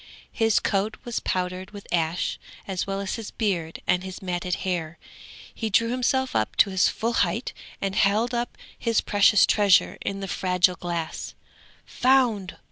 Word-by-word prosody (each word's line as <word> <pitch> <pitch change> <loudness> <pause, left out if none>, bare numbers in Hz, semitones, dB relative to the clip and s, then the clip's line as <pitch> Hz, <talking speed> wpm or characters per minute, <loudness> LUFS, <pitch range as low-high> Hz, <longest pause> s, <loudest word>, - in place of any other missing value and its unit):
His 225 -2 +2
coat 205 +1 -1
was 240 -2 -2
powdered 185 0 -3
with 205 -1 -11
ash, 165 0 0 0.3
as 190 -1 -2
well 195 0 -2
as 200 - -3
his 225 -2 -6
beard 175 -7 -2
and 180 0 +1
his 185 -1 -7
matted 180 -1 -2
hair. 170 -3 -2 0.6
He 225 - -3
drew 230 +3 +2
himself 260 +1 0
up 110 0 0
to 200 - +4
his 190 -1 +3
full 230 +2 -2
height - - 0 0.3
and 195 -1 -2
held 215 +5 +2
up 240 0 -2 0.2
his 230 -2 +1
precious 205 -1 +5
treasure, 205 -3 +3
in 195 - -3
the 195 - -5
fragile 180 -1 +2
glass: 170 -2 -4 0.5
"Found! 245 -7 +2
195 Hz, 160 wpm, -25 LUFS, 180-225 Hz, 0.6 s, precious